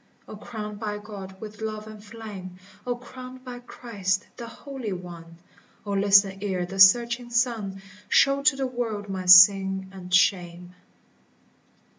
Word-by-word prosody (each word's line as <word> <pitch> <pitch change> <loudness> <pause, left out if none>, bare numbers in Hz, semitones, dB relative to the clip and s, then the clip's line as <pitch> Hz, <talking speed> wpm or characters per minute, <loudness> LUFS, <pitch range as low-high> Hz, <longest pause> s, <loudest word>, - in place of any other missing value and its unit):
O - - -9
crowned 210 -1 -8
by 210 -1 -4
God 200 -2 -10
with 215 0 -10
love 215 -1 -5
and 215 -1 -12
flame! 205 -4 -10 0.3
O 245 - -1
crowned 255 +1 -12
by 245 -1 -8
Christ 205 -6 -4
the 235 - -8
Holy 255 -3 -7
One! 170 -2 -10 0.5
O 205 - -5
listen 195 -1 +3
ere 190 -3 -2
the 195 +2 -8
searching 235 +5 +5
sun 230 -5 -1 0.3
Show 275 0 +3
to 280 - +3
the 270 0 -2
world 230 -5 -4
my 185 -1 -5
sin 190 +1 +6
and 185 -2 -11
shame. 180 -1 +1
205 Hz, 145 wpm, -25 LUFS, 190-235 Hz, 0.5 s, sin